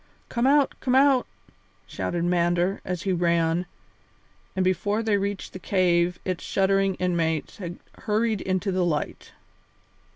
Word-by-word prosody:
"Come 240 +1 +1
out! 285 0 +4
Come 255 -1 0
out!" 270 -1 +4 0.6
shouted 170 -1 -3
Mander, 175 +1 +1
as 180 -2 -4
he 195 - 0
ran, 170 0 +1 0.9
and 190 -1 +1
before 205 +4 0
they 220 -2 +2
reached 200 0 -3
the 185 - -7
cave 180 -2 +2
its 185 -2 -3
shuddering 195 0 +1
inmates 165 -4 -1
had 175 -3 -6 0.2
hurried 220 -3 0
into 190 +1 -1
the 185 -1 +1
light. 160 -4 -3
185 Hz, 135 wpm, -25 LUFS, 175-205 Hz, 0.9 s, out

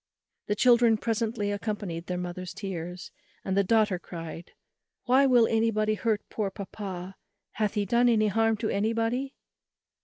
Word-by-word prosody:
The 205 - 0
children 235 -1 +5
presently 220 -2 -1
accompanied 205 -5 -4
their 180 - -2
mother's 180 0 -5
tears, 180 -2 -6 0.3
and 190 - -1
the 200 - +4
daughter 210 -2 +2
cried 165 -1 -8 0.5
"Why, 265 +3 +5
will 245 -3 +5
anybody 220 -1 +1
hurt 215 +1 -1
poor 210 -3 -2
papa? 195 -2 -7 0.3
hath 215 -1 -1
he 205 -1 +1
done 240 +4 +3
any 215 -2 +3
harm 225 +1 +2
to 215 +1 -2
anybody?" 230 +6 -1
215 Hz, 145 wpm, -27 LUFS, 190-225 Hz, 0.5 s, children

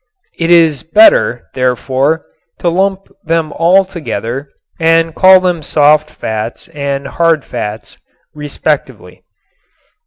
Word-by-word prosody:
It 165 0 -1
is 165 -6 +4
better, 165 - +3
therefore, 130 +4 -1 0.3
to 175 - -1
lump 190 +2 -1 0.2
them 160 -1 -1
all 185 +4 +3
together 135 - -5 0.3
and 165 0 +2
call 185 +2 +6
them 180 -3 -1
"soft 150 +1 +2
fats" 110 +5 -6
and 140 -3 -4
"hard 165 0 0
fats," 110 -3 -7 0.3
respectively. 150 -1 -4
155 Hz, 105 wpm, -13 LUFS, 135-170 Hz, 0.3 s, call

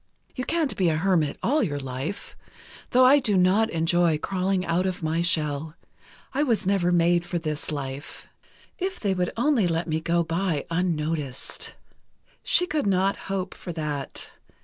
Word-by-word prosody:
You 255 - -3
can't 320 -2 0
be 180 -3 +2
a 155 - +1
hermit 170 -4 +1
all 295 +5 +2
your 145 - -1
life, 135 +7 -5 0.5
though 255 +1 +5
I 280 +3 +7
do 215 -7 +1
not 190 +5 +4
enjoy 165 -1 +2
crawling 185 +2 -1
out 175 +3 +1
of 180 -2 -4
my 160 +2 0
shell.... 155 -2 0 0.6
I 275 - +1
was 230 -8 +1
never 190 -2 +2
made 175 0 +3
for 175 - -3
this 155 -2 -3
life—if 145 - -7
they 200 -3 0
would 180 -1 0
only 240 -6 +3
let 165 +1 -1
me 160 0 0
go 170 +1 +1
by 165 -2 -1
unnoticed. 160 -6 -2 0.7
She 360 - +3
could 300 - -1
not 195 0 +2
hope 190 -1 -2
for 180 - -7
that. 150 -4 -4
175 Hz, 160 wpm, -25 LUFS, 160-200 Hz, 0.7 s, I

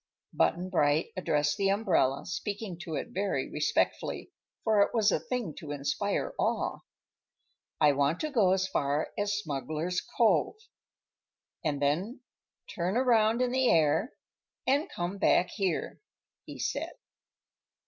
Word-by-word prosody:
Button 180 +2 +1
Bright 150 -2 +2
addressed 150 -5 0
the 195 -1 +2
umbrella, 185 -10 +1
speaking 200 +2 -4
to 160 - -4
it - - -4
very 195 +2 -2
respectfully, - - -1 0.3
for 215 -2 +3
it 200 - +2
was 220 -2 +4
a - - +1
thing 240 -11 -3
to 155 - -9
inspire 145 - -2
awe. - - 0 1.0
"I 150 -1 +6
want 140 +3 +1
to 310 - -2
go 210 -9 +3
as 190 0 +2
far 145 -4 0
as 205 -1 0
Smuggler's 155 +1 -2 0.2
Cove, 210 - +3 1.1
and 145 -2 -1
then 175 - -1 0.5
turn 180 +5 -1
around 235 -2 +3
in 250 - 0
the 260 0 +2
air 160 - +3 0.5
and 280 +4 +2
come 175 +3 -4
back 180 -2 +3
here," 190 -6 -2 0.4
he - - -9
said. - - -3
185 Hz, 135 wpm, -29 LUFS, 150-215 Hz, 1.1 s, I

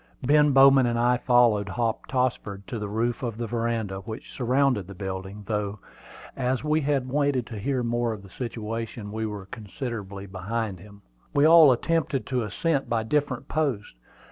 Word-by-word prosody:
Ben 150 +2 +4
Bowman 135 -1 +6
and 120 0 0
I 120 +1 +3
followed 120 -4 +3
Hop 115 +2 -2
Tossford 120 -6 -2
to 115 - -5
the 105 -1 -4
roof 115 +3 -1
of 115 -4 -3
the 120 - -3
veranda, 115 -4 -2
which 110 +5 -8
surrounded 125 -5 +1
the 100 - -10
building, 95 +1 -6
though, 105 0 -2 0.6
as 130 0 -1
we 155 +1 +1
had 140 -3 0
waited 140 -2 +1
to 110 -3 -7
hear 130 +3 -1
more 120 0 0
of 105 -3 -7
the 100 - -13
situation, 115 -1 -5
we 110 +1 -2
were 105 -2 -6
considerably 100 -1 -6
behind 100 +1 -4
him. 100 +1 -15 0.3
We 145 +1 +5
all 160 -3 +8
attempted 145 +1 0
the 130 -2 -1
ascent 140 - -1
by 115 -1 0
different 135 +1 -1
posts. 140 -10 -1
115 Hz, 170 wpm, -26 LUFS, 105-130 Hz, 0.6 s, all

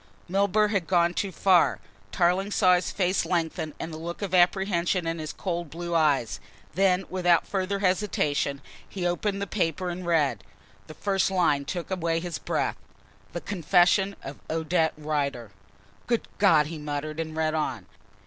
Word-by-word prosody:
Milburgh 200 +3 +2
had 195 -6 0
gone 175 -1 +3
too 195 +2 -2
far. 185 -1 +3 0.3
Tarling 180 +3 +2
saw 185 -3 +4
his 180 0 +1
face 185 -1 0
lengthen 160 -3 -2
and 160 - -5
the 155 - -6
look 170 +4 -6
of 190 -2 -4
apprehension 180 -1 +2
in 165 0 -2
his 155 -1 -4
cold 175 -3 -4
blue 170 +2 -5
eyes. 145 -10 +2 0.3
Then, 190 +1 +2
without 175 -2 +3
further 195 0 -1
hesitation, 180 -8 0 0.3
he 185 -3 -4
opened 195 +3 -1
the - - -1
paper 180 -3 -1
and 180 +1 -6
read. 155 -7 +1 0.4
The 155 - -10
first 195 -2 +1
line 170 -7 +1
took 175 +4 -5
away 165 -3 0
his 175 0 -5
breath. - - -1 0.6
"THE - - -4
CONFESSION 190 +2 +2
OF 135 - -8
ODETTE 160 0 +1
RIDER." 140 -7 -2 0.6
"Good 235 -2 0
God!" 165 -7 +5
he 160 +1 -6
muttered 150 +1 -4
and 160 -1 -4
read 155 -1 +1
on. 130 - -2
175 Hz, 160 wpm, -26 LUFS, 155-190 Hz, 0.6 s, God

